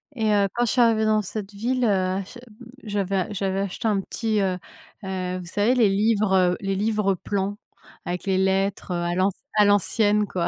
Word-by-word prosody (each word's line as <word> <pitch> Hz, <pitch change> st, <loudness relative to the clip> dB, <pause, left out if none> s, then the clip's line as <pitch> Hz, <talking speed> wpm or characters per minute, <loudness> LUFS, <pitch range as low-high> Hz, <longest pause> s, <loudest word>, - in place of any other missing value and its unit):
Et 220 Hz, -3 st, +1 dB
heu, 200 Hz, -1 st, +3 dB
quand 240 Hz, -, +2 dB
je 230 Hz, -, 0 dB
suis 250 Hz, -, +3 dB
arrivée 225 Hz, -2 st, +3 dB
dans 215 Hz, 0 st, +3 dB
cette 205 Hz, +1 st, -6 dB
ville, 245 Hz, +5 st, -1 dB
heu, 190 Hz, -2 st, +1 dB
j 245 Hz, -, -12 dB
hem, -, -, -16 dB, 0.4 s
j'avais 200 Hz, -2 st, -2 dB
j'avais 195 Hz, -1 st, -1 dB
acheté 200 Hz, +3 st, -3 dB
un 205 Hz, -3 st, +1 dB
petit, 220 Hz, +2 st, -2 dB
heu, 185 Hz, -2 st, 0 dB, 0.5 s
heu, 185 Hz, -1 st, -3 dB
vous 180 Hz, -, -7 dB
savez 205 Hz, +8 st, +1 dB
les 235 Hz, -4 st, +4 dB
livres, 210 Hz, 0 st, +2 dB
heu, 180 Hz, -1 st, +3 dB
les 195 Hz, 0 st, -1 dB
livres 210 Hz, -1 st, +1 dB
plans 200 Hz, +2 st, -3 dB, 0.5 s
avec 175 Hz, 0 st, -4 dB
les 190 Hz, -1 st, +1 dB
lettres, 190 Hz, 0 st, 0 dB
heu, -, -, 0 dB
à 175 Hz, 0 st, -1 dB
l'anc 185 Hz, +2 st, +2 dB, 0.2 s
à 210 Hz, -1 st, +5 dB
l'ancienne, 205 Hz, +1 st, +3 dB
quoi. 180 Hz, -4 st, -2 dB
200 Hz, 205 wpm, -24 LUFS, 190-215 Hz, 0.5 s, à